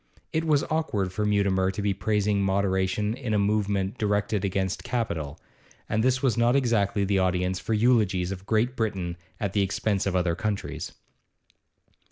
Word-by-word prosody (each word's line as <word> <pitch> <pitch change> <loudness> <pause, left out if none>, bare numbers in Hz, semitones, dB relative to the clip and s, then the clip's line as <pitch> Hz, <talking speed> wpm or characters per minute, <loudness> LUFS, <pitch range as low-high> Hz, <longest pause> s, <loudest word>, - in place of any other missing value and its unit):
It 160 +1 0
was 150 -3 +3
awkward 110 - -1
for 105 +1 0
Mutimer 100 -2 +2
to 95 - -5
be 100 -1 +1
praising 105 -1 0
moderation 95 +1 +1
in 120 -3 -2
a - - +3
movement 100 0 0
directed 105 -1 0
against 95 -1 -1
capital, 85 - -3 0.5
and 110 +1 0
this 130 +2 +2
was 130 -4 +3
not 120 +2 +3
exactly 110 -6 +2
the 100 0 +1
audience 90 0 0
for 110 - -1
eulogies 105 -6 +2
of 95 0 -7
Great 115 +3 +1
Britain 95 -7 -2 0.2
at 100 -2 -2
the 105 - +2
expense 100 +1 0
of 95 - -1
other 90 -2 +2
countries. 100 +3 -3
100 Hz, 165 wpm, -26 LUFS, 95-110 Hz, 0.5 s, was